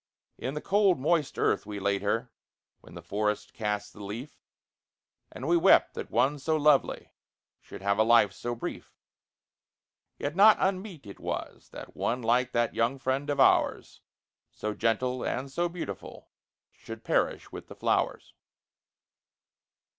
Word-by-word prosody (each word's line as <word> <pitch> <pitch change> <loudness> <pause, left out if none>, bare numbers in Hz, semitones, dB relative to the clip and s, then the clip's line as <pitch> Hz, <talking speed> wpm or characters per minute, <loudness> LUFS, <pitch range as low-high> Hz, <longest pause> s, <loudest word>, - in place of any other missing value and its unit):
In 135 +3 -4
the 150 - -4
cold 200 -2 +3
moist 155 +1 0
earth - - +1
we 105 -1 -5
laid 100 0 0
her, 115 +4 -1 0.5
when - - -16
the 85 - -9
forests 105 +3 -2
cast 105 -2 -3
the 105 - -11
leaf, 115 +9 -8 0.9
And 130 - -7
we 170 - +4
wept 170 - +5
that - - -6
one 145 +3 +1
so 155 +3 0
lovely 150 -2 +2 0.5
should - - -12
have 100 +1 +1
a - - +6
life 115 -3 +4
so 120 +4 -4
brief; 115 - -7 1.2
Yet 145 +2 -4
not 210 +3 +7
unmeet 190 -4 -2
it 100 - -11
was - - -6
that - - -11
one 125 +1 -2
like 125 +2 +2
that 120 0 0
young 120 +4 0
friend 135 +2 -2
of 145 - -1
ours, - - +2 0.5
So 105 0 -4
gentle 120 +4 0
and 135 +2 -3
so 175 +5 -1
beautiful, 175 0 -8 0.4
should 115 0 -10
perish - - 0
with - - -9
the - - -11
flowers. - - -1
125 Hz, 150 wpm, -28 LUFS, 105-150 Hz, 1.2 s, not